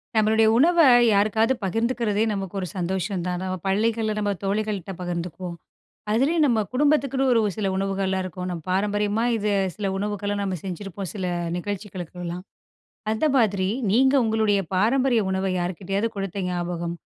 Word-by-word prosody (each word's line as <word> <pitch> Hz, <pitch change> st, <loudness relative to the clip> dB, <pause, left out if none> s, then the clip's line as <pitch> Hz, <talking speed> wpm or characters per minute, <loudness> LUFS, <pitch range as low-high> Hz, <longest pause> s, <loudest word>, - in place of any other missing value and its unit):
நம்மளுடைய 220 Hz, +1 st, +4 dB
உணவ 340 Hz, +6 st, +4 dB, 0.3 s
யாருக்காது 215 Hz, +4 st, +3 dB
பகிர்ந்துக்கிறதே 225 Hz, +1 st, 0 dB
நமக்கு 195 Hz, -2 st, -4 dB
ஒரு 185 Hz, -, -3 dB
சந்தோஷம் 185 Hz, +1 st, -2 dB
தான். 180 Hz, 0 st, -2 dB
நம்ம 185 Hz, 0 st, -2 dB
பள்ளிகள்ல 220 Hz, +2 st, +1 dB
நம்ம 205 Hz, -1 st, 0 dB
தோழிகள்கிட்ட 200 Hz, -1 st, -2 dB
பகிர்ந்துக்குவோம். 175 Hz, 0 st, -4 dB, 0.6 s
அதுலேயும் 295 Hz, +8 st, +3 dB
நம்ம 230 Hz, -5 st, +2 dB
குடும்பத்துக்குன்னு 275 Hz, -1 st, +2 dB
ஒரு 230 Hz, -, +4 dB, 0.2 s
சில 205 Hz, -3 st, -1 dB
உணவுகள்லாம் 195 Hz, -1 st, -1 dB
இருக்கும். 180 Hz, 0 st, -5 dB
நம்ம 170 Hz, -2 st, -5 dB
பாரம்பரியமா 205 Hz, +3 st, +1 dB
இது 210 Hz, -1 st, -1 dB, 0.3 s
சில 205 Hz, -2 st, -2 dB
உணவுகள 205 Hz, 0 st, -2 dB
நாம 190 Hz, -2 st, -2 dB
செஞ்சிருப்போம், 195 Hz, 0 st, -5 dB
சில 190 Hz, -3 st, -3 dB, 0.3 s
நிகழ்ச்சிகளுக்கெல்லாம். 180 Hz, -3 st, -6 dB, 0.7 s
அந்த 220 Hz, +7 st, 0 dB
மாதிரி 200 Hz, -5 st, +2 dB, 0.2 s
நீங்க 265 Hz, +5 st, +4 dB
உங்களுடைய 220 Hz, -2 st, +2 dB, 0.2 s
பாரம்பரிய 240 Hz, +4 st, +3 dB
உணவ 190 Hz, 0 st, -1 dB
யார்க்கிட்டயாவது 195 Hz, +5 st, -2 dB
கொடுத்த 195 Hz, 0 st, -3 dB
ஞாபகம், 175 Hz, -1 st, -3 dB
200 Hz, 135 wpm, -24 LUFS, 185-220 Hz, 0.7 s, நம்மளுடைய